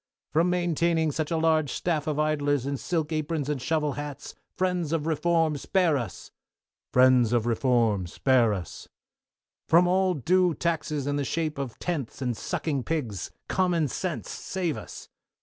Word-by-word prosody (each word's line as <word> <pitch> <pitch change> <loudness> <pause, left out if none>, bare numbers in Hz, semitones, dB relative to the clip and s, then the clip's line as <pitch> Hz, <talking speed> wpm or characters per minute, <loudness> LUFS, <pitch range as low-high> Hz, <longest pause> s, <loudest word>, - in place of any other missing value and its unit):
From 165 +3 +3
maintaining 170 -2 +1
such 155 +1 -2
a 165 - 0
large 160 -3 +2
staff 155 -4 -1
of 150 -2 -1
idlers 145 -3 +1
in 140 0 -1
silk 160 +1 -2
aprons 155 -2 -2
and 145 -4 -2
shovel 155 0 0
hats, 145 -1 -6 0.2
Friends 180 -4 0
of 155 -2 0
Reform, 165 -1 +1
spare 175 +2 +2
us. 120 - -5 0.6
Friends 125 -2 +5
of 120 -2 +2
Reform, 115 -5 +2
spare 120 +4 +3
us. 95 -4 -6 0.8
From 170 +2 +6
all 185 +1 +2
undue 180 +3 +2
taxes 155 -4 -1
in 145 0 -1
the 145 - 0
shape 155 +1 -2
of 130 -5 -5
tenths 155 -9 -4
and 125 -3 -1
sucking 140 +4 -2
pigs. 125 - -3 0.2
Common 175 -4 +1
sense, 175 +4 -4
save 180 -6 -3
us. - - -9
155 Hz, 155 wpm, -27 LUFS, 135-165 Hz, 0.8 s, From